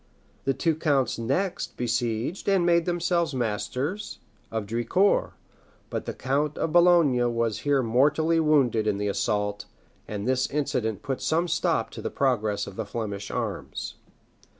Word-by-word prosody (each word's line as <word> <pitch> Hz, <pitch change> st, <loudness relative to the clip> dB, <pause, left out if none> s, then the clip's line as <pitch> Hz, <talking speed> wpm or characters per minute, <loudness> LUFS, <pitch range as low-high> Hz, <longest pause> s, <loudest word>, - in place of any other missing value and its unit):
The 135 Hz, 0 st, +1 dB
two 165 Hz, +4 st, +1 dB
counts 140 Hz, -7 st, +1 dB
next 140 Hz, +12 st, -2 dB
besieged 120 Hz, -, -1 dB
and 190 Hz, -3 st, +3 dB
made 170 Hz, -1 st, +3 dB
themselves 175 Hz, -3 st, 0 dB
masters 125 Hz, -, -2 dB, 0.3 s
of 110 Hz, -2 st, -3 dB
Drincourt; 120 Hz, -, +1 dB, 0.6 s
but -, -, -3 dB
the -, -, -2 dB
count 145 Hz, +3 st, -1 dB
of 160 Hz, -, -1 dB
Boulogne 155 Hz, -9 st, +4 dB
was 115 Hz, -2 st, 0 dB
here 140 Hz, 0 st, +2 dB
mortally 150 Hz, +8 st, +3 dB
wounded 135 Hz, -9 st, +3 dB
in 105 Hz, -2 st, +1 dB
the 105 Hz, 0 st, -1 dB
assault; 105 Hz, 0 st, -1 dB, 0.4 s
and 105 Hz, +1 st, -4 dB
this 130 Hz, 0 st, +1 dB
incident 125 Hz, -7 st, -1 dB
put 135 Hz, -2 st, -3 dB
some 165 Hz, +2 st, +1 dB
stop -, -, 0 dB
to -, -, -8 dB
the -, -, -3 dB
progress 110 Hz, -6 st, 0 dB
of 100 Hz, -, -10 dB
the 110 Hz, -, -2 dB
Flemish 105 Hz, -3 st, -4 dB
arms. -, -, -4 dB
130 Hz, 150 wpm, -26 LUFS, 110-160 Hz, 0.6 s, Boulogne